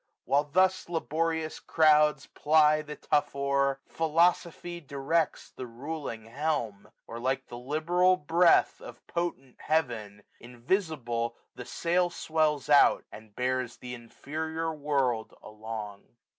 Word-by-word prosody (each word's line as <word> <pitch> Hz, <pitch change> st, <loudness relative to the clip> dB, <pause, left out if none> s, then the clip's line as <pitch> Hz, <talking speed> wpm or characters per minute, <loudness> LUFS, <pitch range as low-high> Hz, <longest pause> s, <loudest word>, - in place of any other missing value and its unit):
While 145 Hz, +2 st, +2 dB
thus 185 Hz, +4 st, +1 dB
laborious 160 Hz, -1 st, -2 dB
crowds 150 Hz, -2 st, +3 dB
Ply 155 Hz, 0 st, +3 dB
the 150 Hz, 0 st, -8 dB
tough 145 Hz, -1 st, 0 dB
oar. 140 Hz, 0 st, 0 dB
Philosophy 170 Hz, +1 st, 0 dB
directs 145 Hz, +3 st, -1 dB
The 130 Hz, -, -8 dB
ruling 125 Hz, -2 st, -6 dB
helm; 115 Hz, -6 st, -3 dB, 0.2 s
or 115 Hz, -, -8 dB
like 130 Hz, +2 st, -1 dB
the 120 Hz, -, -7 dB
liberal 170 Hz, +7 st, +2 dB
breath 170 Hz, +2 st, +3 dB
Of -, -, -12 dB
potent 170 Hz, -7 st, -4 dB
Heaven, 115 Hz, -10 st, -2 dB, 0.2 s
invisible, 120 Hz, -, -2 dB, 0.2 s
the -, -, -9 dB
sail 175 Hz, +1 st, 0 dB
Swells 155 Hz, -4 st, 0 dB
out, 145 Hz, -1 st, +5 dB
and 105 Hz, -1 st, -13 dB
bears 125 Hz, -1 st, -2 dB
th' -, -, -25 dB
inferior 160 Hz, +7 st, -5 dB
world 140 Hz, -6 st, -1 dB
along. 105 Hz, -1 st, -8 dB
145 Hz, 115 wpm, -28 LUFS, 120-160 Hz, 0.2 s, out